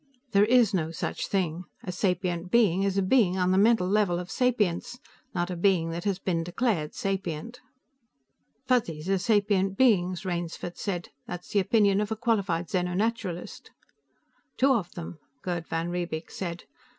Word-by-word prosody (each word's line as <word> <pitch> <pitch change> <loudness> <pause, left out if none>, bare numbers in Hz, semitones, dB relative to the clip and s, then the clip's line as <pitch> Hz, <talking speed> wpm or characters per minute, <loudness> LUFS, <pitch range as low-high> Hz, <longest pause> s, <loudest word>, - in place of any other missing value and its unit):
"There 200 +1 +5
is 235 -2 +4
no 160 -4 0
such 165 - -3
thing. 180 -3 -1 0.2
A 180 - -4
sapient 180 -1 -1
being 195 -5 +4
is 195 0 0
a 195 - +3
being 190 -3 +3
on 180 0 +2
the 185 - +3
mental 215 -3 +4
level 195 -3 +2
of 180 +1 -6
sapience, 235 -4 0 0.4
not 175 +1 -1
a - - -3
being 170 -2 +2
that 170 +3 -5
has 200 -3 +1
been 175 -3 -1
declared 175 -3 -1
sapient." 195 +3 -3 1.1
"Fuzzies 180 -11 0
are 195 - +2
sapient 200 -1 +2
beings," 190 -7 +3
Rainsford 175 -1 -4
said. 180 -4 -3 0.2
"That's 180 0 -7
the 205 - +2
opinion 200 0 +3
of 210 +1 -3
a - - +1
qualified 200 -7 0
xeno 180 -1 -1
naturalist." 210 -5 -3 0.9
"Two 270 +1 +4
of 195 -8 -1
them," 170 -1 -7 0.2
Gerd 175 -2 -3
van 165 +1 -2
Riebeek 175 -2 -4
said. 175 -2 -5
185 Hz, 160 wpm, -27 LUFS, 175-210 Hz, 1.1 s, There